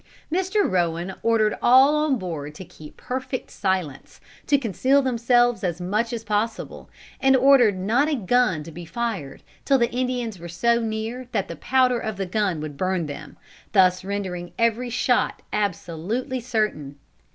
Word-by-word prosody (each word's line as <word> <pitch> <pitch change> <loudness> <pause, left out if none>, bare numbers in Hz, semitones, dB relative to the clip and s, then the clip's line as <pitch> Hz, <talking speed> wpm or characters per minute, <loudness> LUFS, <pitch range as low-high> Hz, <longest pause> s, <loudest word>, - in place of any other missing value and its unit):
Mr. 380 +3 +1
Rowan 175 0 -1
ordered 225 -2 +2
all 265 +4 +6
on 300 -3 +1
board 155 -6 -6
to 185 - -9
keep 155 -3 -14
perfect 255 0 -5
silence, 185 -8 -3 0.3
to 285 - +4
conceal 265 +3 +2
themselves 240 -2 +2
as 175 -2 -2
much 210 +6 -1
as 230 -2 -4
possible, 215 +1 -3 0.3
and 270 0 +4
ordered 255 -6 +5
not 230 +11 +1
a 305 - +1
gun 230 - +1
to 165 - -10
be 175 +2 -9
fired 185 - -4 0.2
till 275 - +3
the 235 -2 +1
Indians 245 -5 -2
were 170 +1 -8
so 235 +7 +2
near 225 +2 -4
that 195 - 0
the 170 - -7
powder 250 - +2
of 220 -3 -4
the 195 - -2
gun 185 -3 -1
would 150 -2 -7
burn 185 -1 -1
them, 145 -1 -9 0.4
thus 185 -2 +4
rendering 185 -3 -4
every 230 +2 +1
shot 245 +1 0
absolutely 210 - -2
certain. 215 - -2
220 Hz, 160 wpm, -23 LUFS, 180-250 Hz, 0.4 s, all